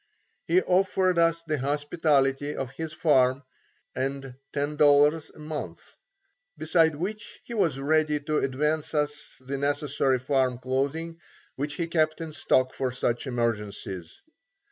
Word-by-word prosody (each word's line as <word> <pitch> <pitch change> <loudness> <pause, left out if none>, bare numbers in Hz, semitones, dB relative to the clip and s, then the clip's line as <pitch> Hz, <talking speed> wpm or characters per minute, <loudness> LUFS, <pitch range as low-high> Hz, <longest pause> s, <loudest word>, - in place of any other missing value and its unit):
He 180 +3 +3
offered 185 -1 +2
us 165 0 +3
the 155 -3 -2
hospitality 145 0 +1
of 130 -2 -4
his 160 +3 -5
farm 135 -4 +2 0.5
and 135 0 -3 0.2
$10.00 145 +1 +3
a - - -15
month, 150 0 -7 0.6
beside 160 -1 +3
which 205 +7 -5
he 235 - -8
was 170 - +1
ready 150 +1 +2
to 150 +1 0
advance 150 +4 -1
us 150 0 -2
the 135 +1 -4
necessary 140 -2 +1
farm 130 -1 0
clothing 140 +6 -2 0.4
which 145 +2 -3
he 170 - -1
kept 155 -2 +1
in 165 -1 -5
stock 130 -3 +1
for 130 -1 -2
such 120 +1 -1
emergencies. 105 -7 -3
145 Hz, 130 wpm, -26 LUFS, 135-160 Hz, 0.6 s, He